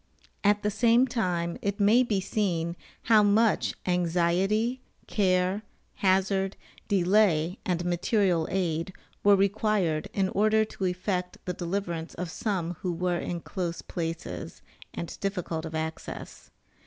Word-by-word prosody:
At 205 0 +3
the 210 - +1
same 235 +3 +4
time 180 -9 -1
it 200 0 -2
may 210 +5 +5
be 220 -6 +1
seen 175 -4 -1 0.3
how 220 -2 +6
much 210 +2 +3
anxiety, 180 +7 +1 0.2
care, 185 0 +1 0.4
hazard, 190 0 +1 0.3
delay 185 -3 +3
and 175 -1 0
material 175 -1 +1
aid, 175 -1 -1 0.3
were 205 0 +7
required 195 -5 +1
in 190 -1 0
order 215 +2 +3
to 195 -3 -5
effect 180 0 -2
the 180 - -2
deliverance 175 -2 -3
of 175 -1 -4
some 175 -3 -2
who 180 - -1
were 175 0 -1
in 170 -1 -4
close 170 -1 -4
places, 165 -1 -5 0.3
and 170 - -6
difficult 180 -5 -3
of 160 - -7
access. 160 0 -6
185 Hz, 130 wpm, -28 LUFS, 170-205 Hz, 0.4 s, were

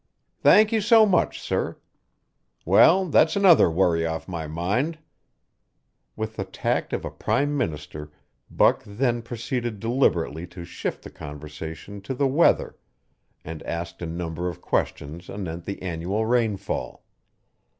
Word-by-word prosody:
"Thank 215 +1 +6
you 220 -1 +2
so 220 +1 +6
much, 185 -4 +1
sir. - - -2 0.9
Well, 190 +3 +6
that's 160 -1 +3
another 190 - +6
worry 85 -1 +2
off 80 0 -3
my 85 -4 -5
mind." 100 - -1 1.2
With 110 0 -5
the - - -1
tact 95 - -2
of - - -3
a - - -5
prime 145 +1 0
minister 75 - -4 0.4
Buck - - +3
then 120 +3 -1
proceeded 120 -1 -4
deliberately 90 - 0
to 85 0 -10
shift - - -5
the - - -10
conversation 80 +6 -8
to 115 +7 -5
the 140 - +1
weather 140 +5 +2 0.7
and 80 -1 -7
asked 85 0 -5
a 85 - -3
number 85 +1 -4
of 85 - -8
questions 80 +5 -3
anent 85 -4 -6
the 100 - -5
annual 95 +5 -2
rainfall. 110 -4 -1
95 Hz, 135 wpm, -24 LUFS, 80-125 Hz, 1.2 s, Thank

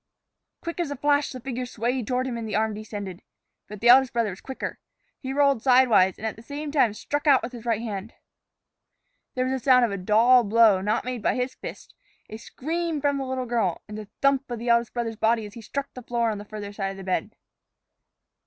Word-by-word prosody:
Quick 335 +1 -5
as 340 -4 -1
a 285 - -3
flash 285 +1 +1
the 255 - -7
figure 250 0 -4
swayed 245 0 -2
toward 255 0 0
him 255 -2 -3
and 230 -1 -5
the 210 - -2
arm 220 0 +1
descended. 205 -4 -7 0.5
But 210 -1 -10
the 240 - +4
eldest 260 +1 +7
brother 230 -3 0
was 185 - -10
quicker. 265 - -6 0.4
He 265 - -5
rolled 280 -3 +3
sidewise, 245 -8 +4
and 220 - -7
at 220 - -2
the 225 - -13
same 290 +5 -6
time 245 -8 +2
struck 290 +6 -3
out 275 -3 +5
with 235 - -4
his 240 -2 -10
right 230 -1 0
hand. 210 -1 -6 1.2
There 255 0 0
was 260 - -1
the 260 -3 -3
sound 250 -2 +6
of 225 - -3
a 200 - -3
dull 230 +6 +5
blow 215 -2 +4
not 210 +4 0
made 250 -2 -4
by - - +1
his 250 +1 -2
fist, - - -10 0.4
a 220 - -6
scream 325 +6 -3
from 285 -1 0
the 270 - -3
little 260 -1 -3
girl, 230 -7 -1
and 210 - -8
the 210 -1 -8
thump 275 -1 +2
of 240 - -3
the 235 +2 -4
eldest 235 0 +3
brother's 230 -2 -3
body 225 0 +2
as 205 - -10
he 230 - -9
struck 280 +5 -5
the 250 - -8
floor 235 -1 0
on 210 - -4
the 205 - -9
farther 205 -1 -7
side 195 -2 -2
of 195 - -7
the 195 - -8
bed. 185 -1 -2
235 Hz, 235 wpm, -25 LUFS, 215-260 Hz, 1.2 s, eldest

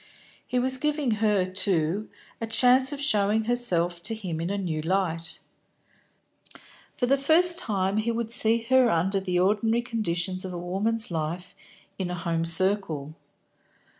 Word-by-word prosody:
He 250 - -2
was 260 +1 0
giving 300 -3 -1
her, 205 -4 +2
too, 185 +1 0 0.3
a 225 - -3
chance 255 +4 +3
of 285 - -6
showing 215 -5 +1
herself 180 -8 0
to 225 +5 -3
him 180 -7 -5
in 170 - -3
a 200 - -2
new 165 -6 -3
light. 165 -1 -2 1.6
For 245 - -1
the 275 +2 +2
first 340 +5 +5
time 195 -2 -1
he 215 +2 -1
would 230 -1 -3
see 230 -1 +3
her 260 -2 +4
under 190 +2 0
the 185 -2 -2
ordinary 215 +5 +1
conditions 185 -6 -2
of 185 -1 -6
a - - -5
woman's 200 +5 -2
life 165 +3 -4 0.5
in 185 -2 -3
a 180 - -3
home 165 -1 -2
circle. 165 -4 +1
200 Hz, 155 wpm, -25 LUFS, 175-235 Hz, 1.6 s, first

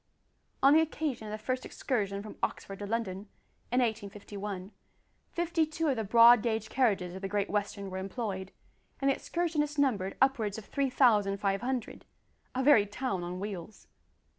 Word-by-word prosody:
On 275 +1 +8
the 320 - +7
occasion 295 -7 -2
of - - -6
the 215 - -3
first 255 0 -1
excursion 200 -6 -2
from 215 - -9
Oxford 195 -1 -3
to 205 - -5
London, 205 -3 -3 0.4
in 250 +1 +3
1851, 205 -3 -4 0.6
fifty 340 -1 +1
two 315 0 -1
of 270 - +2
the 225 - -2
broad 230 +2 +7
gauge 220 -2 -1
carriages 200 -9 +1
of 190 - -7
the 195 - -2
Great 205 0 -1
Western 200 -1 -2
were 185 - -4
employed, 195 -1 -4 0.5
and 275 0 +3
the - - +1
excursionists 305 -4 -1
numbered 210 -9 +1
upwards 230 -7 +2
of 220 - -8
three 280 -2 -1
thousand 210 -6 +3
five 195 0 0
hundred 255 -1 -3 0.5
a 260 - 0
very 240 -7 +6
town 205 -3 -3
on 180 +1 -5
wheels! 200 0 -7
215 Hz, 170 wpm, -30 LUFS, 200-265 Hz, 0.6 s, On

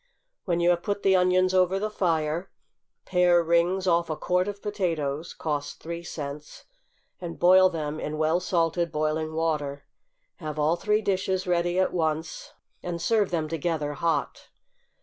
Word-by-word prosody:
When 175 -2 0
you 175 +1 +4
have 175 -1 0
put 205 +1 -3
the 190 -1 +4
onions 185 0 +3
over 185 0 +3
the 210 +2 -2
fire, 165 -2 -1 0.6
pare 180 -2 +3
rings 170 +3 +2
off 170 -2 +2
a 155 - -1
quart 180 +4 0
of 205 -1 -5
potatoes, 170 -8 -2
(cost 145 -2 -3
three 170 +1 -6
cents,) 150 -3 -8 0.5
and 170 -2 -6
boil 185 +1 +6
them 155 -3 -4
in 150 +1 -4
well 160 +2 +2
salted 170 -2 0
boiling 155 0 -1
water. 150 -3 -2 0.5
Have 155 -4 -6
all 155 +2 +2
three 210 +4 0
dishes 190 -1 0
ready 175 0 0
at 185 - +2
once, 160 -2 -2 0.3
and 175 -1 -4
serve 210 +3 +2
them 160 -3 -1
together 155 -2 -2
hot. 155 -1 -2
170 Hz, 155 wpm, -26 LUFS, 155-185 Hz, 0.6 s, boil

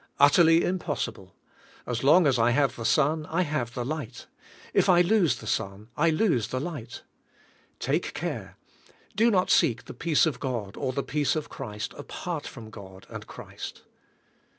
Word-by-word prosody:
Utterly 165 +4 +6
impossible. 185 -1 -3 0.5
As 120 0 -3
long 160 +6 +6
as 130 -4 +3
I 115 +1 +4
have 130 0 +2
the 115 - -6
sun 155 +4 +2
I 170 +3 +1
have 145 -7 -3
the 125 - -2
light. 130 -4 -5 0.5
If - - +3
I 175 -1 +6
lose 180 - +3
the 115 - -11
sun 105 -1 -3
I 165 +3 +3
lose 155 - +2
the 130 +2 -3
light. 140 -6 -6 0.7
Take - - -1
care! - - -5 0.6
Do 225 +3 +4
not 185 -4 +2
seek 120 - +3
the - - -8
peace 155 +6 +2
of 145 -6 -2
God 115 -7 -3
or 130 - -2
the 140 +2 -2
peace 145 0 0
of 155 - -3
Christ 105 -6 -6
apart - - -5
from 110 -2 -10
God 95 -2 -12
and - - -8
Christ. - - -9
140 Hz, 170 wpm, -27 LUFS, 120-165 Hz, 0.7 s, Utterly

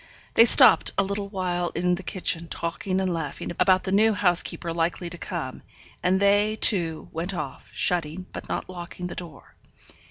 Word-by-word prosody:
They 230 - +7
stopped - - +7
a - - +3
little 200 +1 -4
while 180 -3 -2
in 180 +1 +1
the 180 - -3
kitchen, 170 -2 -1
talking 180 +3 -3
and 185 -2 -1
laughing 160 -2 -5
about 185 -1 +3
the 190 - -3
new 215 +3 +4
housekeeper 175 -3 0
likely 170 +1 -2
to 175 - -6
come; - - -5 0.4
and 185 +1 +2
they, 205 +2 +3
too, 170 -7 +2
went 175 +4 -4
off, 150 -5 -7
shutting, 175 +1 -1
but - - -8
not - - -3
locking 180 0 -8
the 180 - -5
door. 165 -6 -9
180 Hz, 170 wpm, -25 LUFS, 170-195 Hz, 0.4 s, They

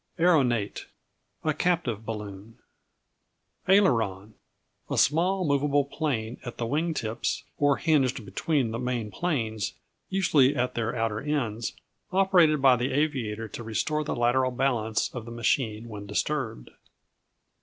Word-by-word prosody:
Aeronate 130 - +2 0.6
A 155 - +1
captive 145 - -1
balloon. 105 0 -7 1.1
Aileron 110 - +3 0.6
A - - -2
small 180 +5 +3
movable 145 -1 +2
plane 130 -7 -3
at 120 - -7
the 120 - -2
wing 155 +7 -1
tips, 110 -3 -2 0.2
or 145 -1 +3
hinged 135 -8 +1
between 130 +3 0
the 115 - -3
main 120 -4 -2
planes, 110 - -2 0.3
usually 155 -8 +3
at 125 +1 0
their 115 0 -2
outer 115 -2 -1
ends, 120 -7 -2 0.4
operated 180 -6 +4
by 130 -2 +7
the 125 +2 -1
aviator 125 -7 -1
to 120 - -7
restore 150 +7 -1
the 150 - -3
lateral 120 +2 +2
balance 120 -4 0
of 120 -3 -6
the 115 - -8
machine 115 -1 0
when 105 -2 -8
disturbed. 110 - -2
125 Hz, 130 wpm, -27 LUFS, 110-150 Hz, 1.1 s, by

